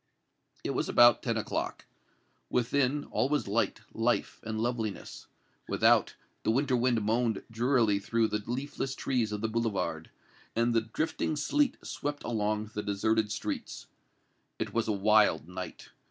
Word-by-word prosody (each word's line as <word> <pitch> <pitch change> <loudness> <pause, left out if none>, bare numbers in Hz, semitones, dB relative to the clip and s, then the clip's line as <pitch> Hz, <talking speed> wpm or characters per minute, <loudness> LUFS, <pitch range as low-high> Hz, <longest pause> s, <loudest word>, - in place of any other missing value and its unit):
It - - -1
was - - -1
about 120 -1 +6
ten - - -1
o'clock. - - -3 0.6
Within, 135 +3 +1
all 135 - +1
was 150 -6 0
light, 110 +1 0
life 115 +2 0
and 110 0 -4
loveliness; 115 -3 -3 0.4
without, - - +3 0.3
the - - -1
winter 130 +3 +2
wind 120 -1 +2
moaned 115 0 +1
drearily 115 -3 +2
through 110 +2 +1
the 105 - -1
leafless 135 +1 -3
trees 120 -5 0
of 105 -1 -3
the 110 - +1
Boulevard, 115 -2 -2 0.5
and 115 +1 +2
the 115 - +3
drifting 155 +7 -2
sleet 285 - +1
swept 145 0 -4
along 110 -1 -1
the 105 - -2
deserted 105 +1 0
streets. - - -4 0.7
It - - -4
was 115 -1 0
a - - +2
wild 105 -5 +3
night. 90 +1 -7
115 Hz, 145 wpm, -30 LUFS, 105-125 Hz, 0.7 s, about